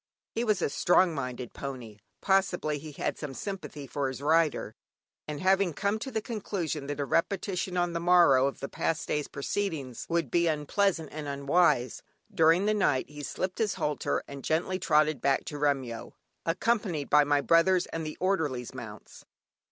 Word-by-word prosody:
He 230 - -1
was 215 -6 +1
a - - +1
strong 175 +3 +3
minded 125 -4 -5
pony 125 -6 -7 0.2
(possibly 180 -6 +1
he 150 +1 -9
had - - -3
some 145 -3 -6
sympathy 190 -7 -6
for 140 +1 -2
his 130 0 -5
rider) 155 +1 +2 0.5
and 150 -1 -4
having 190 -2 +3
come 205 +4 0
to 265 - -5
the 220 -4 -3
conclusion 175 - -3
that 145 0 -4
a 140 - 0
repetition 180 +3 -1
on 175 -1 +1
the 170 - -1
morrow 170 -7 +5
of 140 - -5
the 140 - -3
past 160 +2 -2
day's 150 -1 -1
proceedings 140 - -3
would 165 -6 0
be 170 0 +3
unpleasant 160 +2 0
and 150 -1 -6
unwise, 140 -2 +2 0.3
during 165 +4 +4
the 215 - +3
night 145 -10 +1
he 150 0 -8
slipped 185 +5 -4
his 215 -4 +1
halter 150 -1 -1
and 140 -1 -9
gently 175 +4 0
trotted 155 -5 +2
back 140 -1 +1
to 150 - -6
Remyo, 135 -5 -1 0.3
accompanied 180 -4 0
by 150 0 +7
my 145 0 +2
brother's 170 +5 +4
and 165 - -5
the 155 0 -6
orderly's 150 -11 -1
mounts. 110 -5 -10
155 Hz, 175 wpm, -29 LUFS, 140-185 Hz, 0.5 s, by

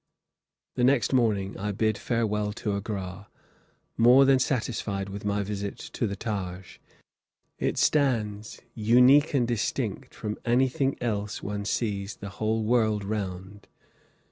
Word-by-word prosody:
The 125 - -1
next 130 0 +3
morning 105 -6 +1
I 105 +1 -2
bid 110 +2 0
farewell 105 -3 -1
to 105 -1 -3
Agra, 100 -1 -5 0.7
more 125 +4 +7
than 135 -1 +5
satisfied 110 -7 -2
with 100 +1 -7
my 105 0 0
visit 100 0 -4
to 115 - -3
the 100 - -4
Taj. 95 -3 -5 0.8
It - - -1
stands 110 -8 0
unique 125 +7 +5
and 125 -3 +2
distinct 120 -3 -2
from 105 0 -5
anything 130 +2 +1
else 105 -3 -2
one 105 0 -4
sees 100 -1 -2
the 100 - -8
whole 110 +4 -1
world 110 -2 +2
round. 100 -1 -5
105 Hz, 130 wpm, -27 LUFS, 100-120 Hz, 0.8 s, more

